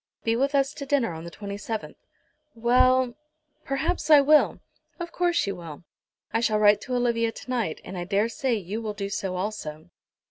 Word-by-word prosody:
Be 225 Hz, 0 st, +1 dB
with 275 Hz, +4 st, +1 dB
us 275 Hz, +1 st, +2 dB
to 280 Hz, -, -7 dB
dinner 265 Hz, -10 st, +1 dB
on 160 Hz, +1 st, -8 dB
the -, -, -6 dB
27th." 205 Hz, +3 st, -5 dB, 0.6 s
"Well, 255 Hz, +2 st, +3 dB, 0.5 s
perhaps 285 Hz, +4 st, -1 dB
I 300 Hz, -2 st, +9 dB
will." 295 Hz, +2 st, +4 dB, 0.4 s
"Of 345 Hz, 0 st, -5 dB
course 350 Hz, -1 st, +1 dB
you 200 Hz, -1 st, -3 dB
will. 170 Hz, -2 st, -9 dB, 0.5 s
I 225 Hz, -, +2 dB
shall 225 Hz, -2 st, +2 dB
write 210 Hz, -1 st, +5 dB
to 255 Hz, -, -3 dB
Olivia 235 Hz, -2 st, +1 dB
to 255 Hz, -, -12 dB
night, 230 Hz, -10 st, -1 dB
and 190 Hz, -, -8 dB
I 175 Hz, -1 st, -4 dB
daresay 230 Hz, -, 0 dB
you 205 Hz, +2 st, -4 dB
will 215 Hz, -2 st, -3 dB
do 200 Hz, -1 st, -4 dB
so 190 Hz, -2 st, -2 dB
also." 180 Hz, -4 st, -5 dB
230 Hz, 180 wpm, -26 LUFS, 200-265 Hz, 0.6 s, I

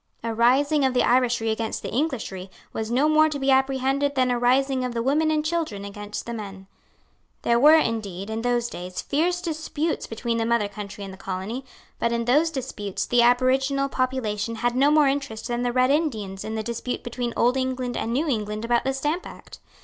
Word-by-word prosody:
A 230 Hz, -1 st, -2 dB
rising 275 Hz, +6 st, +3 dB
of 260 Hz, -1 st, +1 dB
the 250 Hz, -, +4 dB
Irishry 240 Hz, -3 st, +2 dB
against 220 Hz, 0 st, -3 dB
the -, -, -4 dB
Englishry 225 Hz, -, -2 dB, 0.2 s
was 220 Hz, 0 st, -3 dB
no 260 Hz, +5 st, +3 dB
more 310 Hz, 0 st, +5 dB
to 300 Hz, -, -3 dB
be 270 Hz, 0 st, +1 dB
apprehended 270 Hz, +1 st, +1 dB
than 255 Hz, -1 st, +2 dB
a 245 Hz, -, 0 dB
rising 260 Hz, +2 st, +2 dB
of 250 Hz, -1 st, -3 dB
the 230 Hz, -, -1 dB
women 300 Hz, +5 st, +2 dB
and 305 Hz, -1 st, 0 dB
children 310 Hz, -12 st, -2 dB
against 205 Hz, +1 st, -6 dB
the 235 Hz, -, -5 dB
men. 195 Hz, -3 st, -7 dB, 0.8 s
There 235 Hz, 0 st, +3 dB
were 300 Hz, +5 st, +8 dB
indeed, 205 Hz, -, -2 dB
in 220 Hz, +1 st, -2 dB
those 240 Hz, 0 st, +1 dB
days, 180 Hz, -3 st, -7 dB
fierce 350 Hz, +5 st, 0 dB
disputes 315 Hz, -1 st, -2 dB
between 230 Hz, +1 st, -2 dB
the 225 Hz, -, 0 dB
mother 235 Hz, -3 st, +2 dB
country 205 Hz, 0 st, -8 dB
and 195 Hz, -1 st, -7 dB
the 190 Hz, -, -13 dB
colony; 195 Hz, +8 st, -4 dB, 0.4 s
but 235 Hz, -, +1 dB
in 235 Hz, 0 st, -1 dB
those 295 Hz, +7 st, +3 dB
disputes 255 Hz, -9 st, -4 dB
the 245 Hz, 0 st, +3 dB
aboriginal 265 Hz, +3 st, +3 dB
population 230 Hz, -5 st, -1 dB
had 240 Hz, +2 st, -1 dB
no 275 Hz, +3 st, +4 dB
more 300 Hz, -1 st, +5 dB
interest 270 Hz, -5 st, -2 dB
than 240 Hz, -1 st, -2 dB
the 245 Hz, 0 st, 0 dB
Red 255 Hz, +2 st, +3 dB
Indians 220 Hz, -11 st, -1 dB
in 220 Hz, -, -4 dB
the 220 Hz, -, -2 dB
dispute 235 Hz, +2 st, -4 dB
between 240 Hz, 0 st, -3 dB
Old 245 Hz, +2 st, +3 dB
England 260 Hz, -2 st, -2 dB
and 230 Hz, -, -2 dB
New 285 Hz, +7 st, 0 dB
England 215 Hz, -4 st, -2 dB
about 235 Hz, 0 st, +2 dB
the 270 Hz, 0 st, -1 dB
Stamp 300 Hz, +6 st, -2 dB
Act. -, -, -12 dB
245 Hz, 205 wpm, -24 LUFS, 225-275 Hz, 0.8 s, were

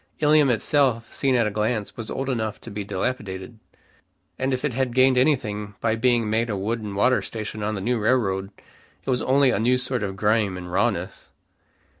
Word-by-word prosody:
Ilium 150 Hz, -2 st, +4 dB
itself, 120 Hz, 0 st, +1 dB
seen 135 Hz, -2 st, +1 dB
at 120 Hz, -2 st, +3 dB
a 105 Hz, -, -1 dB
glance, 105 Hz, 0 st, -2 dB
was 115 Hz, -2 st, -7 dB
old 135 Hz, -, -3 dB
enough 110 Hz, -5 st, -2 dB
to 115 Hz, -, -9 dB
be 105 Hz, 0 st, -4 dB
dilapidated, 100 Hz, 0 st, -4 dB, 0.8 s
and 130 Hz, +1 st, 0 dB
if 130 Hz, +2 st, -1 dB
it 145 Hz, -, -1 dB
had 125 Hz, -1 st, -1 dB
gained 130 Hz, 0 st, +5 dB
anything 110 Hz, -7 st, 0 dB
by 115 Hz, -1 st, +1 dB
being 120 Hz, -1 st, +2 dB
made 115 Hz, +2 st, 0 dB
a 105 Hz, -, -1 dB
wood 110 Hz, +4 st, -2 dB
and 105 Hz, -2 st, -6 dB
water 125 Hz, +6 st, +3 dB
station 110 Hz, -1 st, -6 dB
of 105 Hz, +1 st, -1 dB
the 100 Hz, -, -4 dB
new 120 Hz, +4 st, 0 dB
railroad, 100 Hz, -4 st, +1 dB, 0.6 s
it -, -, -4 dB
was 125 Hz, -, +1 dB
only 135 Hz, 0 st, +3 dB
a 100 Hz, -, 0 dB
new 125 Hz, +3 st, +3 dB
sort 125 Hz, -1 st, -2 dB
of 95 Hz, -2 st, -3 dB
grime 105 Hz, -1 st, +1 dB
and 90 Hz, -1 st, -8 dB
rawness. 95 Hz, -1 st, -1 dB
115 Hz, 200 wpm, -24 LUFS, 105-130 Hz, 0.8 s, gained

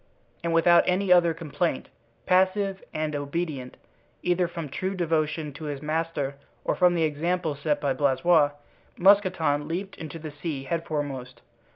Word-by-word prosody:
And 170 Hz, -, 0 dB
without 170 Hz, +1 st, +5 dB
any 185 Hz, 0 st, +3 dB
other 175 Hz, -1 st, +5 dB
complaint, 165 Hz, -2 st, -2 dB, 0.4 s
passive 190 Hz, +1 st, +2 dB
and 155 Hz, -1 st, -2 dB
obedient, 145 Hz, -2 st, -4 dB, 0.5 s
either 180 Hz, 0 st, +2 dB
from 170 Hz, -2 st, -6 dB
true 190 Hz, +7 st, -3 dB
devotion 155 Hz, -3 st, -1 dB
to 155 Hz, +3 st, -8 dB
his 145 Hz, -2 st, -4 dB
master 155 Hz, -3 st, -2 dB, 0.3 s
or -, -, +2 dB
from 180 Hz, -1 st, +3 dB
the 165 Hz, -, +2 dB
example 160 Hz, +2 st, 0 dB
set 145 Hz, +1 st, -1 dB
by 140 Hz, -2 st, 0 dB
Blaisois, 145 Hz, +3 st, +3 dB, 0.5 s
Mousqueton 185 Hz, -7 st, +3 dB
leaped 190 Hz, +4 st, -4 dB
into 160 Hz, 0 st, -7 dB
the 155 Hz, -1 st, -7 dB
sea 150 Hz, -2 st, -5 dB
headforemost. 145 Hz, -7 st, -3 dB
160 Hz, 145 wpm, -26 LUFS, 145-175 Hz, 0.5 s, without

